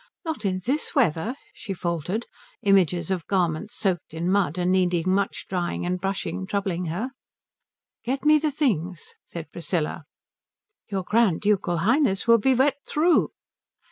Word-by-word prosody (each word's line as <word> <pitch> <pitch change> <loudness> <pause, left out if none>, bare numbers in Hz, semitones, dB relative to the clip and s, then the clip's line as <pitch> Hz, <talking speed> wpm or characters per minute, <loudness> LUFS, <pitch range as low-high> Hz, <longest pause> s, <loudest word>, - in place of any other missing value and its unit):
"Not 320 -10 -3
in 185 -1 0
this 285 +5 -1
weather?" 220 - +2 0.2
she 215 - -6
faltered, 175 +6 -2 0.4
images 185 -3 +3
of 180 -3 -2
garments 185 +3 0
soaked 180 -8 -2
in 170 +3 -1
mud 185 -5 +1
and 180 0 +1
needing 180 -1 +2
much 200 +1 -1
drying 175 -2 -2
and 180 0 -2
brushing 190 -1 -3
troubling 195 -3 -1
her. 190 +11 -3 0.9
"Get 270 +4 -2
me 305 0 +6
the 305 +1 +1
things," 190 - -1
said 165 -2 -8
Priscilla. 165 -3 -2 0.8
"Your 195 -2 -2
Grand 210 -3 +2
Ducal 200 -4 +1
Highness 215 - +2
will 230 -1 +6
be 260 +5 +3
wet 275 +2 +3
through." 330 +3 +3
190 Hz, 145 wpm, -25 LUFS, 175-235 Hz, 0.9 s, me